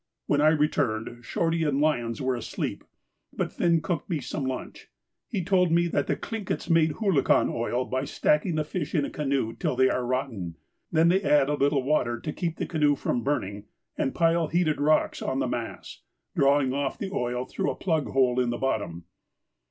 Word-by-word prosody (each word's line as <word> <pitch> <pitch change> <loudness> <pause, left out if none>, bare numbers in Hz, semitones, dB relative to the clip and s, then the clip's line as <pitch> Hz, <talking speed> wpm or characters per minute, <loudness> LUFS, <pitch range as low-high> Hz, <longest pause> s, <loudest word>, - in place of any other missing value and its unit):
When 145 - +2
I 150 - +5
returned 120 -7 0
Shorty 165 +6 0
and 145 -3 +1
Lyons 120 -7 0
were 130 0 +1
asleep, 120 - -4 0.5
but - - -3
Finn 170 -2 +2
cooked 175 -4 -3
me 165 -4 0
some 135 +1 -4
lunch. 130 -1 -6 0.4
He 200 -6 -2
told 180 -1 +3
me 170 +1 +4
that - - 0
the - - +1
Tlinkits 215 -5 -4
make 160 -2 +4
hoolachan 195 -8 +2
oil 120 +2 -1
by 130 +2 -2
stacking 150 +4 +1
the 155 - +1
fish 155 +1 -4
in 145 -3 +2
a - - -6
canoe 135 -6 -1
till 115 - -2
they 130 0 +4
are 125 - -1
rotten, 120 - -3 0.3
they 160 -1 +3
then 180 +4 +3
add 145 -1 +4
a - - +1
little 140 -1 +2
water 125 -5 +1
to 150 - -5
keep 165 -2 -3
the - - -2
canoe 150 -3 +2
from 125 -2 -1
burning, 100 -8 -2 0.3
and 135 - -1
pile 165 -1 +3
heated 160 -2 +1
rocks 155 +1 +2
on - - -1
the - - 0
mass, - - -5 0.3
drawing 140 -1 +3
off 140 0 -2
the 195 - -4
oil 125 -6 -2
through - - -2
a - - -2
plug 160 -6 0
hole 130 -2 +2
at 125 - 0
the 120 - -2
bottom. 100 -10 -2
145 Hz, 195 wpm, -27 LUFS, 125-165 Hz, 0.5 s, I